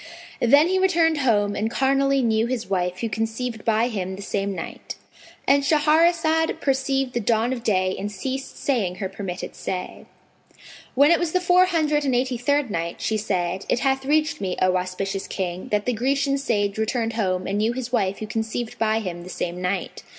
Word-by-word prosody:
Then 285 +7 +5
he 375 +1 +1
returned 335 -4 +3
home 205 -6 +2
and 220 +2 -1
carnally 275 +2 +2
knew 225 0 +2
his 240 -2 -3
wife 180 -1 -1
who 230 - 0
conceived 225 +2 -3
by 225 +1 +2
him 190 -5 -3
the 200 - -8
same 200 0 -2
night.—And 280 +7 -3
Shahrazad 320 +2 +3
perceived 270 -1 0
the 240 - 0
dawn 230 +2 +1
of 245 - -5
day 185 -3 +1
and 205 +1 -4
ceased 265 +7 -5
saying 215 -10 0
her 190 0 -3
permitted 190 -1 -6
say. 180 -1 -5 0.9
When 285 +4 +6
it 340 - +4
was 340 -2 -1
the 365 - +3
Four 360 0 +5
Hundred 305 -4 +1
and 265 -3 +1
Eighty 250 -1 0
third 285 -1 +1
Night, 170 -1 -3
She 220 - -1
said, 185 -3 -2
It 240 - +1
hath 270 -1 +1
reached 305 -2 +1
me, 185 -2 -2
O 185 0 +3
auspicious 190 +2 -3
King, 180 -1 -4
that 210 -1 0
the 250 - +1
Grecian 275 +4 +1
sage 205 -6 -1
returned 225 +1 -1
home 185 -4 -1
and 200 +1 -1
knew 220 +2 +2
his 250 -1 -5
wife 200 -5 +1
who 215 - -5
conceived 220 +1 -4
by 220 0 +1
him 175 -4 -5
the 180 - -10
same 180 0 -4
night. 180 +2 -3
225 Hz, 190 wpm, -23 LUFS, 195-275 Hz, 0.9 s, When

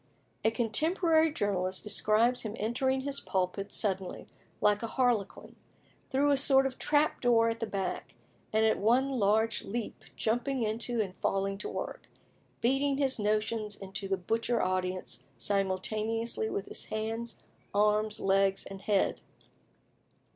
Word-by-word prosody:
A 220 - +5
contemporary 315 - +2
journalist 190 -7 -1
describes 215 +4 +2
him 215 -1 -5
entering 260 +5 0
his 280 +1 -1
pulpit 190 +2 -2
suddenly, 190 -3 -2 0.3
like 210 0 +3
a 230 - -2
harlequin, 240 -4 -1 0.5
through 285 +2 +2
a 280 - +4
sort 270 0 +5
of 265 -1 -3
trap 300 +1 +2
door 230 -2 +4
at 225 0 -3
the 225 - -2
back, 195 -2 -4 0.4
and 220 +1 +3
"at 220 - +2
one 245 +6 +3
large 220 +2 +2
leap 230 +2 -5
jumping 245 +3 0
into 230 +2 -1
it 215 - +2
and 185 -1 -11
falling 195 +1 -1
to - - -4
work," - - -6 0.5
beating 270 +3 +2
his 270 -4 0
notions 215 0 0
into 195 +1 -6
the 195 0 0
butcher 225 +6 0
audience 185 -8 -2 0.2
simultaneously 215 - -1
with 200 - -3
his - - -3
hands, 225 +1 -4 0.3
arms, 210 +1 +2
legs, 195 0 +2
and 195 0 -9
head. 200 -1 +1
220 Hz, 140 wpm, -30 LUFS, 195-245 Hz, 0.5 s, A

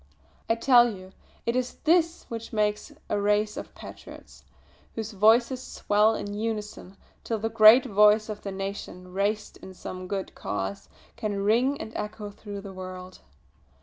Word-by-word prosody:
I 225 - +4
tell 240 0 +5
you 185 -2 -11 0.3
it 235 - 0
is 255 0 -1
this 335 +1 +2
which 230 -1 -7
makes 210 -1 -1 0.2
a 205 - -1
race 210 +1 +1
of - - -8
patriots, - - -12 0.5
whose 220 -1 -4
voices 230 +5 +3
swell 215 -2 +2
in 205 -1 -5
unison 210 -3 -5 0.3
till 225 - -2
the 225 +1 -2
great 225 +3 +7
voice 210 -1 +4
of 210 -1 -6
the 200 - -5
nation, 190 -2 -6
raised 205 +2 -1
in 185 - -12
some 185 0 -7
good 195 0 -4
cause, 100 -1 -4 0.3
can 205 -3 -2
ring 245 +7 +2
and 220 - -7
echo 210 -1 -5
through 205 -1 -8
the 195 -1 -9
world!" 185 0 -9
210 Hz, 155 wpm, -27 LUFS, 195-225 Hz, 0.5 s, great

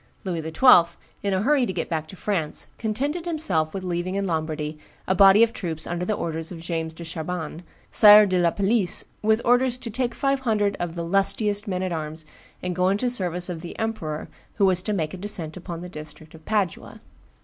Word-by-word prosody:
Louis 175 -4 -3
XII., 170 +1 +5 0.2
in 200 - -1
a 190 +1 0
hurry 270 -1 +3
to - - -2
get 175 -3 -3
back 160 -2 -3
to 190 - -11
France, 180 -6 -2
contented 280 +10 -2
himself 185 - 0
with 195 -1 -5
leaving 180 +1 -2
in 200 0 -1
Lombardy 155 -3 -3 0.3
a - - +3
body 195 +3 +7
of 230 0 +1
troops 160 -4 -4
under 175 +1 -3
the 215 - 0
orders 165 -1 -4
of 175 - -7
James 165 -1 -4
de 170 - -8
Chabannes, 165 0 -5 0.3
Sire 210 -1 +8
de 185 -2 +1
la 170 -1 +4
Palisse, 200 +1 0 0.2
with 220 +2 +2
orders 245 +1 +3
"to 240 -3 -7
take 240 +1 -1
five 275 -1 +1
hundred 210 -5 0
of 175 -1 -3
the 170 - -3
lustiest 200 +3 0
men 185 -1 -2
at 185 - -2
arms 155 -1 -5 0.4
and 180 -1 -2
go 180 +1 +2
into 200 +6 0
the - - +2
service 180 -6 -1
of 175 -3 -5
the 170 - -8
emperor, 195 -9 -3 0.3
who 200 - +3
was 185 -2 +3
to 210 - -3
make 160 -7 -2
a - - -6
descent 180 -5 +1
upon 170 -2 -7
the 180 - -7
district 155 -1 -11
of 160 -1 -14
Padua." 205 -6 -2
185 Hz, 215 wpm, -24 LUFS, 165-210 Hz, 0.4 s, Sire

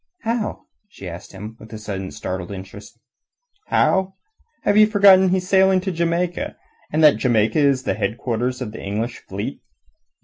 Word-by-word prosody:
"How?" 230 -1 -2 0.3
she 100 - -10
asked 85 0 -9
him 105 +3 -9
with 110 0 -13
a - - -5
sudden 100 -3 -5
startled 90 -1 -5
interest. 100 +4 -10 0.7
"How? 190 0 +2 0.5
Have 205 - +2
you 215 0 +7
forgotten 200 -3 +6
that - - +1
he's 185 -1 0
sailing 190 -1 +4
to 190 +1 -2
Jamaica, 170 +1 -1 0.4
and 155 +1 +1
that 150 - +7
Jamaica 115 0 +2
is 140 -3 +3
the - - 0
headquarters 115 +4 -2
of 110 - -6
the - - -9
English 110 +5 -3
fleet? 100 +2 -6
125 Hz, 165 wpm, -21 LUFS, -, 0.7 s, you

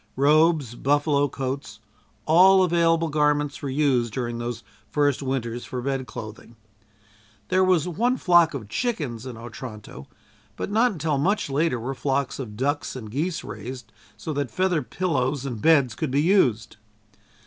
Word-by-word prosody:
Robes, 150 -2 +3
buffalo 145 +2 +1
coats, 130 -5 -5 0.5
all 185 +4 +6
available 165 -2 +2
garments, 150 -1 0
were 140 - -3
used 130 -4 +1
during 120 0 -3
those 120 -1 -5 0.3
first 145 -2 +1
winters 120 -3 -3
for 125 - -5
bed 135 0 -3
clothing. 110 +2 -9 0.9
There 185 0 +3
was 180 -3 +2
one 235 +9 0
flock 175 - +4
of 115 -6 -6
chickens 135 - -3
in 125 -3 -7
Otranto, 110 - -9 0.5
but - - -5
not 230 +4 +3
until 155 -5 -1
much 190 -1 0
later 145 -2 +1
were 125 +4 -4
flocks 135 0 -2
of 105 -6 -7
ducks 145 +3 -1
and 110 -5 -8
geese 160 +7 -2
raised 110 +2 -8 0.3
so 155 - -5
that 140 -3 -2
feather 185 -4 0
pillows 140 -1 -1
and 120 -6 -5
beds 140 -7 +4
could 130 +6 -3
be 140 +3 +1
used. 120 - +2
140 Hz, 150 wpm, -24 LUFS, 120-160 Hz, 0.9 s, all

